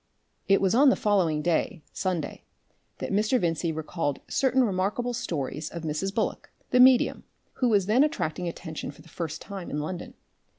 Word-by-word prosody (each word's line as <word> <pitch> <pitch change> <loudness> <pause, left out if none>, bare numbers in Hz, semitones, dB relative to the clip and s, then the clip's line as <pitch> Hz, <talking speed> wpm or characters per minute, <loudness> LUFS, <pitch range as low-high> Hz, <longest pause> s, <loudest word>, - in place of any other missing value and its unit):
It 195 - +4
was 190 0 +2
on 275 +4 +6
the - - +4
following 175 -8 +1
day, 175 - 0
Sunday, 180 -5 -3 0.5
that - - -4
Mr. 215 +5 +2
Vincey 165 -2 0
recalled 160 -2 -3
certain 265 -1 +2
remarkable 210 +4 0
stories 155 - -3
of 170 -1 -7
Mrs. 160 +5 -2
Bullock, 215 +2 -2 0.2
the 250 - +4
medium, 255 -1 +5 0.4
who 250 - +4
was 205 -4 +3
then 225 +7 +4
attracting 180 - -1
attention 160 -2 -6
for 140 - -12
the - - -17
first 160 -2 -5
time 195 -3 -7
in - - -3
London. 170 +4 -5
185 Hz, 170 wpm, -27 LUFS, 160-225 Hz, 0.5 s, on